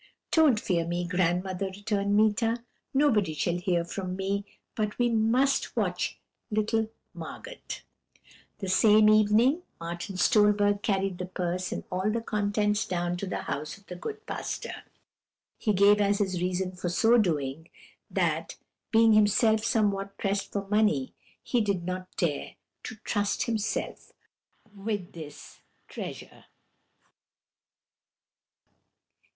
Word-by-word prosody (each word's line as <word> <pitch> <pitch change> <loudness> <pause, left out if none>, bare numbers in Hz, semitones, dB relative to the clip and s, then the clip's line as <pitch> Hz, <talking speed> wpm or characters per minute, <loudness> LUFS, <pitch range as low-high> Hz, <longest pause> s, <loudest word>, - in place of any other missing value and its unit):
"'Don't 300 -9 +5
fear 175 -5 0
me, 175 +1 -2
grandmother,' 180 +1 0
returned 200 +1 -1
Meeta; 225 +2 +2 0.3
'nobody 220 - +2
shall 175 +3 0
hear 175 -1 0
from 185 +1 -4
me 195 +1 -1 0.3
but 210 -2 -2
we 245 -1 +2
must 240 +5 +2
watch - - -1 0.3
little 215 0 0 0.2
Margot.' - - -9 1.0
"That 195 - -5
same 215 +3 +6
evening, 215 - +4 0.2
Martin 170 +3 -5
Stolberg 205 +1 +4
carried 195 -3 0
the 180 - -3
purse 180 0 -2
and - - -4
all 185 +3 0
the 230 +2 0
contents 210 -1 0
down 175 -1 -1
to 195 - -4
the - - -3
house 150 +4 -4
of 200 - -22
the 180 - -8
good 430 - -7
pastor. - - -4 0.9
He 215 - +1
gave 205 +1 +5
as 200 0 +3
his 190 -4 -1
reason 185 +1 -1
for 180 -1 -4
so 235 +6 +4
doing, 160 -4 -1 0.4
that, - - -1 0.3
being 225 -1 +5
himself 215 +1 +4
somewhat 200 -4 0
pressed 200 0 -1
for 200 -1 -3
money, 210 -10 +2 0.3
he 245 - +1
did 200 -4 0
not 185 0 -4
dare 155 -5 -1 0.3
to - - -6
trust 205 -2 0
himself 220 -2 -3 0.6
with 200 -2 -4
this 155 -3 -10 0.3
treasure." - - -8
200 Hz, 125 wpm, -28 LUFS, 180-215 Hz, 1.0 s, same